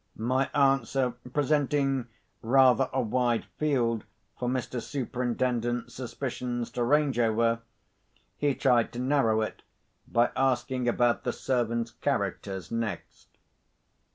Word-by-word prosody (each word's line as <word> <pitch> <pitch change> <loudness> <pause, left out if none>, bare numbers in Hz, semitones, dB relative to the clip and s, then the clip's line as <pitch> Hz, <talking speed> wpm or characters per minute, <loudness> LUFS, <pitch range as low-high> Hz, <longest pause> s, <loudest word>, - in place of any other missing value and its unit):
My 130 +4 0
answer 135 -2 +2 0.2
presenting 140 -2 +1 0.3
rather 130 +2 +4
a 130 - 0
wide 120 +1 +1
field 120 -7 +1 0.4
for 125 - -1
Mr. 125 -1 -2
Superintendent's 120 -2 -2
suspicions 125 -1 -4
to 120 - -1
range 140 -1 +2
over, 115 0 +2 0.8
he 145 -2 0
tried 125 -3 +3
to 120 - -5
narrow 125 -4 +2
it 110 - -4 0.5
by 120 +1 +2
asking 130 -1 0
about 120 0 +2
the - - 0
servants' 120 -3 -1
characters 95 -4 -3
next. 115 -2 -4
125 Hz, 110 wpm, -28 LUFS, 115-135 Hz, 0.8 s, rather